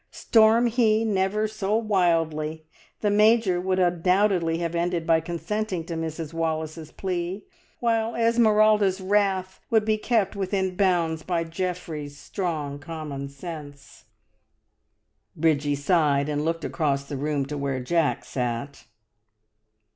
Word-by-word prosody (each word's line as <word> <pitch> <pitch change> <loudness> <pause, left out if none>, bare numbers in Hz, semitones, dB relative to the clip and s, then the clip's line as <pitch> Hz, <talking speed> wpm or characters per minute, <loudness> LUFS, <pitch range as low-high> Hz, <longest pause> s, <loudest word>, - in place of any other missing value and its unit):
Storm 225 +1 +4
he 225 -2 +2
never 210 +1 +1
so 215 -1 -2
wildly, 165 -7 0 0.4
the 210 - +2
Major 210 -3 +4
would 185 0 0
undoubtedly 180 -1 +2
have 170 0 -3
ended 170 -1 -1
by 165 -1 +4
consenting 180 +3 -3
to 170 - -5
Mrs 160 -1 -4
Wallace's 160 -1 -3
plea, 185 +1 -4 0.3
while 230 -1 0
Esmeralda's 215 -4 +3
wrath 190 -1 0
would 220 -2 +3
be 215 -1 +1
kept 220 -3 +1
within 190 -1 -1
bounds 175 -4 +1
by 170 0 -1
Geoffrey's 165 -4 -5
strong 150 -3 -4
common 145 -3 -6
sense. 145 -1 -10 1.3
Bridgie 150 -2 +1
sighed 145 -1 +2
and 150 0 -1
looked 165 +1 -2
across 140 -4 0
the 140 +1 -7
room 145 0 -1
to 150 +2 -5
where 140 -2 -2
Jack 160 +4 0
sat. 125 +2 -4
175 Hz, 125 wpm, -25 LUFS, 155-205 Hz, 1.3 s, Storm